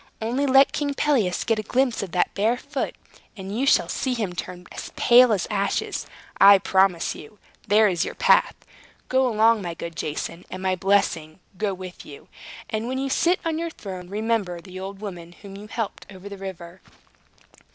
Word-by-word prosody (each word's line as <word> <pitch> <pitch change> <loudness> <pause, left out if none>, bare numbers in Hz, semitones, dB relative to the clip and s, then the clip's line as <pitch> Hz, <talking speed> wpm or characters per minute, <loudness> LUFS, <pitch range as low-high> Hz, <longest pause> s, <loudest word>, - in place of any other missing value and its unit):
"Only 245 +6 -1
let 270 +1 +6
King 285 -1 -2
Pelias 235 -14 +1
get 225 -2 0
a - - 0
glimpse 250 +3 0
of 195 -4 -6
that 180 - +1
bare 220 +5 +1
foot, 280 +1 -4 0.4
and 195 +1 -6
you 265 +4 0
shall - - +4
see 260 -2 -2
him 210 -6 -2
turn 180 0 -7
as - - -7
pale 245 0 +6
as 200 -5 +1
ashes, 200 -1 -1 0.3
I 200 0 +9
promise 190 -2 +2
you. 155 +8 -13 0.3
There 215 +1 +5
is 180 -4 0
your - - -5
path. - - +4 0.5
Go 260 0 +3
along, 225 -1 +3
my 175 -3 -5
good 170 0 -7
Jason, 160 +2 -4
and 185 0 -7
my 185 0 +1
blessing 180 -4 0 0.2
go 200 0 -2
with 185 -1 -9
you. 145 - -13 0.4
And 220 +1 -3
when 260 +1 -2
you 270 0 -2
sit 350 +6 +2
on 325 -1 -1
your 335 0 -2
throne 185 - -8
remember 210 -4 -1
the 185 +1 -10
old 195 +1 -7
woman 175 -5 -8
whom 195 -1 -10
you 205 +2 -10
helped 225 -1 -5
over 190 0 -11
the 200 0 -8
river." 185 -2 -8
200 Hz, 190 wpm, -24 LUFS, 185-240 Hz, 0.5 s, I